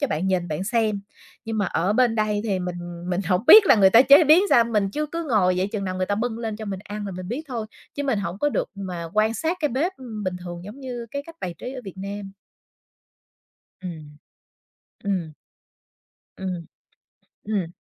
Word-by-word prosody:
cho 285 - +2
bạn 180 -3 -2
nhìn 180 -2 0
bạn 155 +5 -3
xem. 220 -2 0 0.4
Nhưng 225 -1 -3
mà 205 - +1
ở 180 +4 0
bên 240 -1 +3
đây 215 -1 0
thì 200 -4 0
mình 180 -1 -4 0.3
mình 180 +2 0
hổng 180 +4 +1
biết 430 -2 +10
là - - +7
người 195 -3 +6
ta 230 +4 +8
chế 285 +4 +7
biến 315 +6 +7
sao, 235 - +6
mình 210 -4 0
chứ 300 +4 -2
cứ 335 0 -3
ngồi 185 -5 +3
vậy 190 +2 0
chừng 200 -3 -2
nào 185 - -3
người 185 0 -1
ta 205 - 0
bưng 230 +2 -2
lên 220 -2 -4
cho 220 - -7
mình 195 -2 -4
ăn 205 0 -5
là 195 - -5
mình 180 +1 -7
biết 260 +7 -3
thôi, 230 -4 -4 0.3
chứ 285 - -3
mình 265 -7 0
hổng 195 -1 -4
có 295 - +2
được - - -1
mà 180 -4 -5
quan 215 +2 +2
sát 330 +6 -1
cái 300 - +2
bếp, 320 +10 -1
ưm, 220 -6 -7
bình 185 -1 -1
thường 175 0 -7
giống 215 +8 -10
như 245 -3 -6
cái 280 - -4
cách 330 - -12
bài 175 -2 -4
trí 255 - -6
ở 255 - -6
Việt 195 - -8
Nam. 200 0 -6 1.5
Ừm. 155 -5 -8 0.9
Ừm. 185 -6 -2 1.0
Ừm. 180 -3 -5 0.8
Ừm. 195 -6 -2
205 Hz, 220 wpm, -24 LUFS, 185-240 Hz, 1.5 s, biết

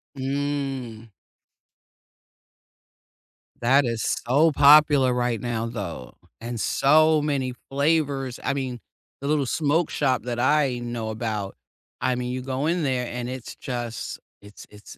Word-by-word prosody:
Mm. 135 -4 -3 2.5
That 135 +4 +4
is 115 -2 -2 0.2
so 150 +6 +4
popular 145 -2 +6
right 120 -2 0
now, 115 -2 -2
though, 100 - -6 0.2
and 120 0 -5
so 155 +6 +4
many 140 -4 -1 0.2
flavors, 140 -3 0
I - - 0
mean, 130 -3 -4 0.4
the 140 - -5
little 150 -2 +1
smoke 155 +4 +1
shop 130 -3 0
that 120 -1 -4
I 135 -1 +2
know 120 -2 -4
about, 110 -3 -4 0.4
I 130 - +1
mean, 125 0 -3
you 130 0 -3
go 135 +3 -2
in 170 0 0
there 130 -3 -1
and 120 0 -5
it's 130 -2 -7
just 120 -3 -5 0.2
it's 105 0 -13
it's, 105 0 -14
130 Hz, 130 wpm, -24 LUFS, 120-145 Hz, 2.5 s, popular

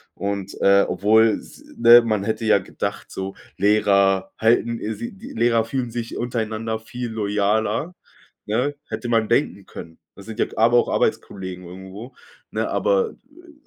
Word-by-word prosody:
Und 100 -1 -4
äh, 100 0 +5
obwohl 110 +2 +3
s - - -15
ne, 120 +1 +8
man 110 -4 -1
hätte 110 +1 -2
ja 110 -2 +5
gedacht 95 - -5
so, 95 0 -5 0.2
Lehrer 100 -1 +3
halten 115 +1 +2 0.2
sie 235 - -6
die 230 +7 -11
Lehrer 115 - +2
fühlen 120 0 -3
sich 115 0 -5
untereinander 110 -2 -3
viel 120 +2 -6
loyaler, 110 - 0 0.5
ne, 125 +7 -1
hätte 120 - -5
man 115 -2 +2
denken 110 -6 0
können. 80 0 -10 0.2
Das 100 - -13
sind 110 0 -9
ja - - +3
aber 115 +2 +4
auch - - +3
Arbeitskollegen 95 -2 -2
irgendwo, 95 +7 -10 0.4
ne, - - -2
aber, 485 -2 +1 0.2
äh, 335 +4 -18
110 Hz, 155 wpm, -22 LUFS, 100-120 Hz, 0.5 s, ne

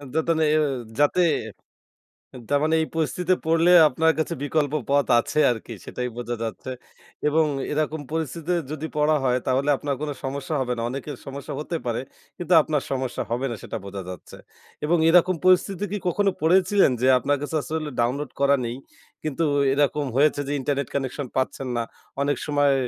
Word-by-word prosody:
যাতে 160 +1 +1
না - - +3
এ - - +4 0.4
যাতে। 145 +5 +3 1.3
তারমানে 150 +3 +2
এই 160 - -1
পরিস্থিতে 170 +3 +1
পড়লে 165 +2 +3 0.2
আপনার 160 +3 +2
কাছে 160 +2 -1
বিকল্প 145 0 0 0.2
পথ 140 0 +3
আছে 150 - -1
আরকি 115 0 -6
সেটাই 125 - -4
বোঝা 120 0 -3
যাচ্ছে। 115 +3 -5 0.6
এবং 155 +2 +3 0.3
এরকম 155 +1 -1
পরিস্থিতি 160 +1 -3 0.2
যদি 155 +1 -4
পড়া 150 +1 +3
হয়, 125 -1 +2
তাহলে 135 +3 +1
আপনার 140 0 -2
কোন 150 - -2
সমস্যা 140 +5 -4
হবে 125 -1 -1
না। 115 - -2
অনেকের 135 +3 -5
সমস্যা 140 +1 -6
হতে 165 +3 -3
পারে। 120 0 -1 0.4
কিন্তু 175 0 0
আপনার 150 -2 -1
সমস্যা 130 -2 -2
হবে 120 +3 0
না 115 - -3
সেটা - - -5
বোঝা 100 0 -6
যাচ্ছে। 90 - -10 0.5
এবং 170 +2 +3
এরকম 180 +1 +5
পরিস্থিতি 185 +1 +3
কি 210 - -1
কখনো 200 +3 +2
পড়েছিলেন? 185 0 +4
যে, 130 - +3
আপনার 145 +4 +1
কাছে 145 +2 -4
আসলে 155 +2 -3
ডাউনলোড 130 +5 0
করা 140 0 +4
নেই। 120 +1 -3 0.5
কিন্তু 155 +1 -1 0.3
এরকম 145 +1 +1
হয়েছে 145 +1 +3
যে, - - -2
ইন্টারনেট 140 0 -1
কানেকশন 135 0 -2
পাচ্ছেন 130 0 -1
না। 115 - 0 0.4
অনেক 145 +1 +1
সময় 145 -2 +3
145 Hz, 170 wpm, -24 LUFS, 130-160 Hz, 1.3 s, এরকম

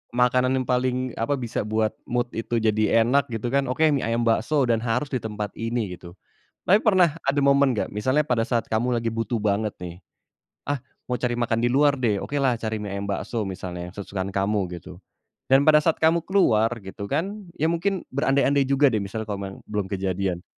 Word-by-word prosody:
Makanan 125 +1 +3
yang 130 - 0
paling, 125 0 0
apa, 115 +6 +1
bisa 120 -4 -3
buat 110 0 +1 0.2
mood 120 0 -1
itu 115 +1 -3
jadi 110 0 +3
enak 140 +5 +2
gitu 120 +1 -3
kan, 140 0 +1
oke, 130 +5 0
mie 140 - 0
ayam 115 +1 0
bakso 120 +6 +2
dan 115 -2 +2
harus 125 +4 -1
di 130 - 0
tempat 105 -1 -4
ini, 115 -4 -2
gitu. 85 0 -12 0.5
Tapi 205 +5 +5
pernah 185 -8 +4
ada 140 +1 +1
momen 140 -1 +4
nggak 110 - -2
misalnya 130 +8 +1
pada 120 -5 +1
saat 120 -1 -1
kamu 120 +2 0
lagi 115 - -2
butuh 115 +1 -2
banget 105 0 0
nih, 90 +1 -8 0.7
"Ah, 145 -3 -1 0.3
mau 125 - 0
cari 120 +1 -1
makan 115 -1 0
di 120 - +2
luar 145 +1 +4
deh", 115 -6 +1
okelah 135 -2 0
cari 110 0 -2
mie 100 - -5
ayam 100 - -4
bakso 105 +2 -2
misalnya 90 -2 -6
yang 90 - -13
kesukaan 95 -1 -4
kamu, 100 +2 +1 0.2
gitu. 85 - -11 0.5
Dan 135 +1 +5
pada 150 0 +6
saat 160 +1 +1
kamu 165 +1 +2
keluar, 115 - +3 0.2
gitu 95 +2 -7
kan, 200 - -3
ya 160 - +1
mungkin 185 +2 -1
berandai-andai 140 0 +2
juga 140 +1 +4
deh 110 - +1
misalnya 100 +3 -4
kalau 100 -1 -3
memang 95 0 -7
belum 105 -2 -3
kejadian, 95 -2 -2
120 Hz, 200 wpm, -24 LUFS, 105-140 Hz, 0.7 s, pada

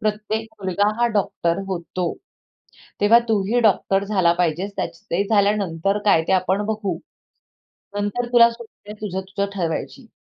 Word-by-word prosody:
प्रत्येक 215 +1 -2 0.2
मुलगा 190 +2 +1
हा 240 - +4
डॉक्टर 170 -4 0
होतो. 180 -1 -3 0.9
तेव्हा 210 +3 +6
तूही 215 +2 +1
डॉक्टर 195 -3 +2
झाला 190 -4 +2
पाहिजेस. 180 +3 0
त्याच - - -4
ते 175 +4 +2
झाल्यानंतर 200 -3 +1
काय 200 -6 +4
ते - - +3
आपण 190 +2 +1
बघू. 210 -5 -2 1.0
नंतर 205 +4 -1
तुला 235 -1 +8
सूट 235 0 -11 0.2
आहे 210 - -6
तुझं, 190 -3 -3
तुझं 195 +1 -3
ठरवायची." 180 +7 -3
200 Hz, 140 wpm, -22 LUFS, 185-215 Hz, 1.0 s, तुला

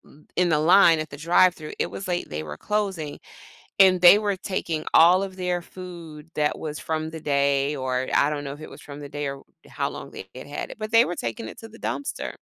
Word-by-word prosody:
th 150 - -21
in 180 0 +2
the 155 -2 +3
line 170 +1 +6
at 155 -1 -4
the - - -8
drive-thru, 165 0 +2
it - - 0
was 195 - -6
late, 175 -1 -2
they 75 - -4
were 75 -1 -8
closing, 195 -8 -2 0.6
and 190 -2 +6
they 180 +3 +9
were 205 -2 -1
taking 170 -4 -3
all 180 +3 +6
of 190 -1 -6
their 180 -1 -1
food 165 -4 -10
that 150 -1 0
was 150 -1 -5
from 160 0 -3
the 160 0 -8
day, 140 -1 +1
or 130 -2 -2
I 140 - +4
don't 145 -1 -3
know 140 - -5
if 145 - -10
it 155 - -9
was - - -12
from 145 0 -10
the 145 - -8
day 145 +1 -4
or 135 0 -9 0.2
how - - -2
long - - -9
they 95 - -10
had 130 - -9
had 145 - -6
it, - - -8
but 215 0 -5
they 230 +1 +7
were 175 - -3
taking 115 -1 -4
it - - -11
to 225 - -10
the 225 +1 -15
dumpster. 285 - -4
160 Hz, 245 wpm, -24 LUFS, 145-185 Hz, 0.6 s, they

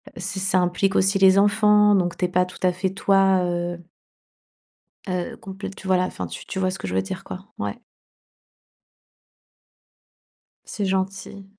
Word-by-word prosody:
heu - - -10
ç 190 +2 -4
ça 190 -1 +2
implique 180 +2 0
aussi 195 +1 +3
les 190 0 +6
enfants, 210 0 +4
donc 175 -2 0
tu 180 - 0
es - - 0
pas 180 0 +2
tout 180 - -12
à 180 - +4
fait 185 +1 -2
toi, 195 -1 +3
heu 175 0 -2 1.3
heu, 180 -1 -3
compl 195 0 -8
tu 190 - -10
vois 185 -1 +3
la, 180 - +1
enfin 90 - -5
tu - - -9
tu - - -7
vois 185 -1 +1
ce - - -7
que - - -5
je 90 - -3
veux 95 - +2
dire 185 - -6
quoi? 185 +3 -8
Ouais. 100 0 -4 2.9
C'est 205 -2 -4
gentil. 190 +1 -3
190 Hz, 175 wpm, -23 LUFS, 180-195 Hz, 2.9 s, les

